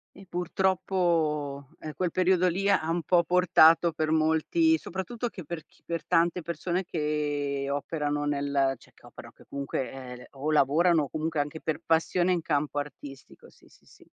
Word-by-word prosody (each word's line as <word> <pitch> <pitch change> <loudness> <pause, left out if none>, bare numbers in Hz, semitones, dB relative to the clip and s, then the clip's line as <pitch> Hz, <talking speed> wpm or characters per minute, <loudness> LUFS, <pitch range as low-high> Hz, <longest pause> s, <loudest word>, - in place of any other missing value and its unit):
E 195 -1 -14
purtroppo, 170 -6 0
ehm, 155 -1 -7
quel 180 -2 -1
periodo 185 0 +3
lì 195 +3 0
ha 175 -5 +2
un 170 0 0
po' 170 +2 +3
portato, 170 -2 +5
per 155 0 -1
molti, 160 - +3
soprattutto 225 - -5
che 180 - -9
per 160 0 -7
chi - - -29
per 170 -1 -4
tante 170 0 +2
persone 175 +3 -2
che 145 -3 -2
operano 145 +1 -2
nel 140 -2 0
cioè - - -21
che - - -18
operano, - - -12
che - - -19
comunque, 140 -1 -3
ehm, 125 -2 -9
o 145 +3 -3
lavorano, 155 +3 +3
o 140 - -6
comunque 155 -1 -2
anche 145 +2 -3
per 160 - -3
passione, 175 +2 +2
in 170 -3 0
campo 145 0 -1
artistico, 145 -2 -8
sì, - - -23
sì, - - -24
sì. - - -20
160 Hz, 175 wpm, -27 LUFS, 145-175 Hz, -, portato